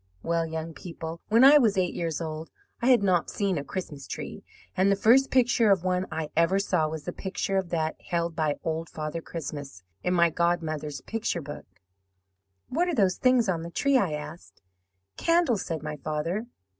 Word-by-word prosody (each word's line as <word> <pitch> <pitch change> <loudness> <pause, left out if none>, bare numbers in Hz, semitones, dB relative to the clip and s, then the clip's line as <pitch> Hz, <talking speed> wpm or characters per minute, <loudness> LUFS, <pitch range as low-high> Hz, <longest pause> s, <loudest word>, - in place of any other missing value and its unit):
"Well, 165 -1 0
young 160 0 -5
people, 165 -1 -7
when 230 +4 +5
I 290 +2 +9
was 220 -6 +2
eight 180 -2 +1
years 165 -2 -3
old 160 0 -5 0.3
I 240 - +1
had 240 -5 +5
not 180 -4 +2
seen 195 -6 -1
a - - -5
Christmas 150 -4 -6
tree, - - -6 0.3
and 195 +2 +3
the - - +4
first 245 +7 +5
picture 240 -3 +3
of 190 -3 +3
one 185 0 0
I 155 -2 -4
ever 170 +4 +3
saw 165 -5 +1
was 155 -1 -5
the - - -5
picture 195 0 -3
of 190 -2 -1
that 160 -2 -2
held 170 -2 -1
by 155 -3 0
Old 160 0 -2
Father 155 +1 -4
Christmas 145 - -7 0.2
in 180 0 +1
my 170 -1 +4
godmother's 155 -4 -1
picture 220 -7 -3
book." 145 +1 -8 1.0
'"What 340 +7 0
are 345 - 0
those 190 -6 +2
things 255 -3 +3
on 175 -3 0
the 170 - -6
tree?' 280 +11 +1
I 180 -9 0
asked. 150 - -8 0.5
"'Candles,' 330 - +2
said 165 -3 -3
my 150 0 -4
father. 155 - -3
170 Hz, 190 wpm, -27 LUFS, 160-200 Hz, 1.0 s, I